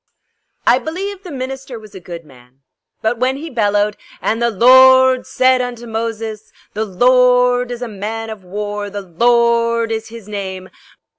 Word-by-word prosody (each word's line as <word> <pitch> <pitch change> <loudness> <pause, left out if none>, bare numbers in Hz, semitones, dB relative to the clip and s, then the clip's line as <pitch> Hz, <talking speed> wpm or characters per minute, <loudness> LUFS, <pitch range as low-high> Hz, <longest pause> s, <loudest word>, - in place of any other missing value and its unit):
I 245 - +4
believe 380 +6 -5
the 375 - -10
minister 265 -1 -6
was 215 -2 -14
a 190 - -9
good 170 -2 -9
man, 125 -1 -20 0.4
but 225 +1 0
when 260 +2 0
he 320 +2 -8
bellowed: 205 -3 +1 0.2
"And 225 +2 -1
the 235 - +2
Lorrrrd 260 +3 +6
said 255 0 +3
unto 240 -1 -5
Moses, 225 -1 -5 0.2
the 220 +1 -2
Lorrrd 250 +3 +3
is 245 0 -5
a - - -4
man 220 +2 -5
of 210 -3 -9
war; 205 +2 -5
the 200 0 -6
Lorrrd 235 +4 +2
is 220 0 -3
his 230 -2 -11
name. 190 -3 -6
230 Hz, 160 wpm, -17 LUFS, 205-250 Hz, 0.4 s, Lorrrrd